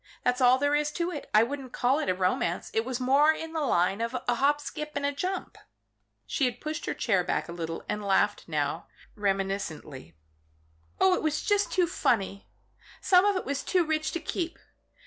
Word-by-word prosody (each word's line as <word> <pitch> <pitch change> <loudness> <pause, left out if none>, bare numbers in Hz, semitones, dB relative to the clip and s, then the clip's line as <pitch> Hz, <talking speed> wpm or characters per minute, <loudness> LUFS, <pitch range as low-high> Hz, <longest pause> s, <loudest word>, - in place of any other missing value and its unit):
That's 250 +1 +1
all 250 0 +6
there 285 +2 +1
is 300 0 +1
to 345 +1 -1
it. 295 - -7
I 215 +1 +6
wouldn't 265 0 -5
call 260 +4 +2
it 250 - -1
a 185 - +2
romance. 180 -1 -1
It 225 - +1
was 255 +1 -3
more 275 +4 +5
in 320 +1 -5
the 320 - -1
line 195 -6 +1
of 230 +2 -1
a 245 - +3
hop, 285 +4 +2
skip 300 +1 -6
and 285 0 -1
jump." 370 +6 -4 0.7
She 275 - 0
had 245 -1 -2
pushed 310 +1 -4
back - - -8
her - - 0
chair 185 -6 +1
a - - -7
little, 165 -1 -5
but 210 - -2
laughed 205 0 +1
now, 150 -3 -2 0.3
reminiscently. 195 - -3 0.8
"Oh 190 - +5
it - - 0
was 310 -1 -1
just 410 -1 +1
too 365 -2 +3
funny! 200 - -1 0.5
Some 365 0 +5
of 410 -1 +3
it 370 - -2
was 280 0 -2
too 360 -3 +1
rich 310 0 -1
to 340 - -1
keep. 335 +1 -3
255 Hz, 200 wpm, -28 LUFS, 195-310 Hz, 0.8 s, all